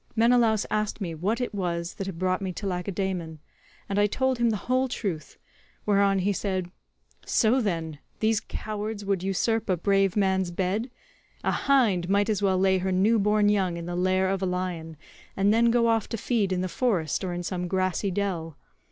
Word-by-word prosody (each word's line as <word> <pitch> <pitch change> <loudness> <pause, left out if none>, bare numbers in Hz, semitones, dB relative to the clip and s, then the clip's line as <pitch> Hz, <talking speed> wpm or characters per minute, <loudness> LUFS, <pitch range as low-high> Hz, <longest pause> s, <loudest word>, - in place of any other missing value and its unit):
Menelaus 230 -2 +3
asked 215 0 -1
me 175 -5 -3
what 195 +9 -1
it 245 -3 -3
was 175 -3 -2
that 195 - -5
had 190 -4 -5
brought 185 +1 0
me 190 -1 -2
to 200 - -6
Lacedaemon, 180 -3 -3 0.5
and 200 0 -1
I 205 - +4
told 260 +3 0
him 235 -1 +3
the 215 - 0
whole 255 +1 +2
truth, 185 - -4 0.5
whereon 200 -1 +3
he 195 +2 +1
said, 185 -3 -2 0.5
'So, 240 +4 +2
then, 165 -7 -2 0.2
these 220 -1 +2
cowards 215 -1 -5
would 195 -2 0
usurp 215 +4 0
a 185 - +2
brave 195 +1 +2
man's 190 -2 +2
bed? 190 +7 -1 0.5
A - - +1
hind 220 -11 +2
might 200 +2 +2
as 205 -2 -1
well 190 -2 +2
lay 190 0 +3
her 190 +1 -1
new 205 +5 +3
born 210 +1 +3
young 190 -4 +1
in 170 - -6
the 175 0 -4
lair 185 +1 +2
of 195 0 -1
a 190 - 0
lion, 180 -3 -3 0.4
and 200 +2 +3
then 235 +1 +4
go 235 0 +3
off 225 -2 +1
to 230 - -3
feed 215 -3 0
in 180 -1 0
the 185 - -1
forest 185 - 0
or 185 - -2
in 175 0 -4
some 180 0 -3
grassy 185 +1 0
dell. 175 -5 -3
195 Hz, 195 wpm, -26 LUFS, 180-215 Hz, 0.5 s, I